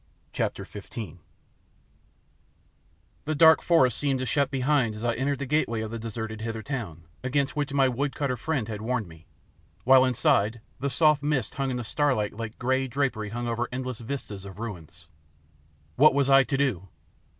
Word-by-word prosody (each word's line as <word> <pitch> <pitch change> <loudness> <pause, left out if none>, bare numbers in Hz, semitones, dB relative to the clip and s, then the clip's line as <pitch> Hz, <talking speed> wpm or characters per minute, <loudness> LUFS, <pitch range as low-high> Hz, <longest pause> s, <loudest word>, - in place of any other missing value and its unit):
CHAPTER - - -2
XV 100 -3 -8 2.1
The 155 +1 -1
dark 160 +2 +7
forest 130 -9 +3
seemed 140 -2 +1
to 130 - -3
shut 140 +2 +1
behind 130 -4 +1
as 110 +2 -6
I 120 - +2
entered 140 +3 -1
the 140 - -4
gateway 125 -5 0
of 110 0 -5
the 115 - -5
deserted 110 -1 -5
Hither 115 -1 -4
town, 105 - -5 0.2
against 140 +2 0
which 145 -2 -1
my 135 -1 +3
wood 135 +3 -2
cutter 140 -3 -1
friend 130 -2 -2
had 105 -2 -5
warned 115 -2 -1
me, 80 0 -16 0.6
while 130 +1 +7
inside 115 -3 +2 0.2
the 140 +3 -1
soft 150 +2 +3
mist 145 -5 -1
hung 135 0 -2
in 125 - -2
the 120 - -3
starlight 125 -4 0
like 115 0 -6
grey 130 +2 0
drapery 125 -6 -1
over 120 0 -2
endless 130 -2 -4
vistas 115 -5 -6
of 100 -1 -10
ruins. 85 -7 -8 0.9
What 150 -1 +6
was 140 -1 +2
I 135 -1 +7
to 135 - -1
do? 125 -10 0
125 Hz, 170 wpm, -26 LUFS, 110-140 Hz, 2.1 s, dark